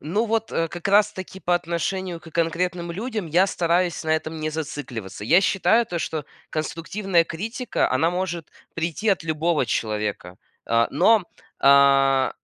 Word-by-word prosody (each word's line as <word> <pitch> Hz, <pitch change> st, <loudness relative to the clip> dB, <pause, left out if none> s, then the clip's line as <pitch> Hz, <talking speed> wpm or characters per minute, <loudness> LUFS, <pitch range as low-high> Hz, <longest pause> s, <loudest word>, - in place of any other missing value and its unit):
Ну 205 Hz, +10 st, -1 dB
вот, 225 Hz, 0 st, -1 dB
э, 165 Hz, 0 st, 0 dB
как 175 Hz, +4 st, -5 dB
раз 210 Hz, +1 st, +4 dB
таки 190 Hz, 0 st, -8 dB
по 180 Hz, -, +1 dB
отношению 175 Hz, +1 st, -2 dB
к 160 Hz, -, -13 dB
конкретным 170 Hz, +2 st, -1 dB
людям 215 Hz, -1 st, -4 dB
я 175 Hz, +5 st, +3 dB
стараюсь 175 Hz, -1 st, 0 dB
на 160 Hz, -, -1 dB
этом 160 Hz, 0 st, -1 dB
не 155 Hz, 0 st, -2 dB
зацикливаться. 140 Hz, -11 st, -6 dB
Я 170 Hz, -, +5 dB
считаю 220 Hz, +4 st, +2 dB
то, 175 Hz, -3 st, -3 dB
что 155 Hz, -2 st, -3 dB, 0.3 s
конструктивная 170 Hz, +3 st, 0 dB
критика 225 Hz, +10 st, -2 dB
она 135 Hz, +6 st, +2 dB
может 175 Hz, -2 st, -3 dB, 0.3 s
прийти 170 Hz, +6 st, -2 dB
от 195 Hz, -, +2 dB
любого 160 Hz, -1 st, 0 dB
человека, 105 Hz, -5 st, -3 dB, 0.3 s
э, 115 Hz, 0 st, +3 dB
но, 210 Hz, +7 st, +4 dB, 0.4 s
э, 135 Hz, -1 st, +5 dB
170 Hz, 155 wpm, -23 LUFS, 150-190 Hz, 0.4 s, Я